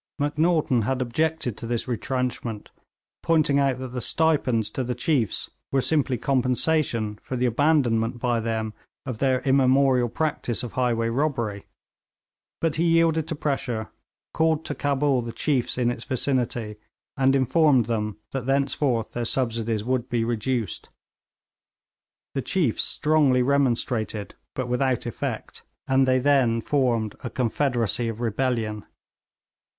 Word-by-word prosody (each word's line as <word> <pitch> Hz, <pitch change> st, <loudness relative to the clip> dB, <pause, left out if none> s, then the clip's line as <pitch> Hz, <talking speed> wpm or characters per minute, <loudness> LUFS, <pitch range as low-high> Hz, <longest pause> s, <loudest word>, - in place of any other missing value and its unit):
Macnaghten 150 Hz, -3 st, +1 dB
had 125 Hz, +4 st, -1 dB
objected 130 Hz, 0 st, -1 dB
to 115 Hz, -, -6 dB
this 120 Hz, +1 st, -2 dB
retrenchment, 125 Hz, -3 st, -3 dB, 0.5 s
pointing 155 Hz, -4 st, +3 dB
out 135 Hz, -2 st, +2 dB
that 130 Hz, 0 st, -6 dB
the 125 Hz, 0 st, -5 dB
stipends 130 Hz, -8 st, +1 dB
to 130 Hz, -, -2 dB
the 125 Hz, 0 st, -3 dB
chiefs 125 Hz, -, 0 dB, 0.2 s
were 135 Hz, -, +2 dB
simply 135 Hz, -2 st, +1 dB
compensation 125 Hz, -3 st, 0 dB
for 130 Hz, -, -5 dB
the 125 Hz, 0 st, 0 dB
abandonment 120 Hz, -3 st, +2 dB
by 120 Hz, -1 st, 0 dB
them 110 Hz, -1 st, -2 dB, 0.3 s
of 125 Hz, -5 st, -5 dB
their 130 Hz, -2 st, +2 dB
immemorial 130 Hz, -2 st, +3 dB
practice 135 Hz, -4 st, -2 dB
of 120 Hz, -, -5 dB
highway 120 Hz, -3 st, 0 dB
robbery, 115 Hz, -6 st, -1 dB, 0.9 s
but 165 Hz, -2 st, 0 dB
he 165 Hz, -, +2 dB
yielded 165 Hz, -1 st, +3 dB
to 165 Hz, -, -3 dB
pressure, 125 Hz, -7 st, -2 dB, 0.4 s
called 160 Hz, -1 st, +1 dB
to -, -, -3 dB
Cabul 140 Hz, -2 st, +1 dB
the 115 Hz, 0 st, -5 dB
chiefs 130 Hz, -1 st, 0 dB
in 120 Hz, -1 st, +2 dB
its 120 Hz, -1 st, -6 dB
vicinity, 120 Hz, -5 st, -1 dB, 0.4 s
and 135 Hz, -1 st, +3 dB
informed 135 Hz, -1 st, +4 dB
them 105 Hz, -3 st, -2 dB
that 135 Hz, -2 st, -4 dB
thenceforth 135 Hz, -4 st, +1 dB
their 120 Hz, -, -3 dB
subsidies 115 Hz, -3 st, -1 dB
would 125 Hz, 0 st, -1 dB
be 120 Hz, -2 st, 0 dB
reduced. 115 Hz, -1 st, -2 dB, 1.4 s
The 135 Hz, -, -1 dB
chiefs 150 Hz, -, 0 dB
strongly 150 Hz, -5 st, +2 dB
remonstrated, 120 Hz, -6 st, 0 dB, 0.2 s
but 130 Hz, -2 st, -2 dB
without 125 Hz, +1 st, 0 dB
effect, 120 Hz, -, -5 dB, 0.3 s
and 135 Hz, 0 st, +3 dB
they 130 Hz, 0 st, +4 dB
then 130 Hz, -4 st, +3 dB
formed 115 Hz, -5 st, 0 dB
a 120 Hz, -, -3 dB
confederacy 120 Hz, -2 st, 0 dB
of 115 Hz, -1 st, -4 dB
rebellion. 115 Hz, -2 st, -1 dB
125 Hz, 135 wpm, -25 LUFS, 115-140 Hz, 1.4 s, informed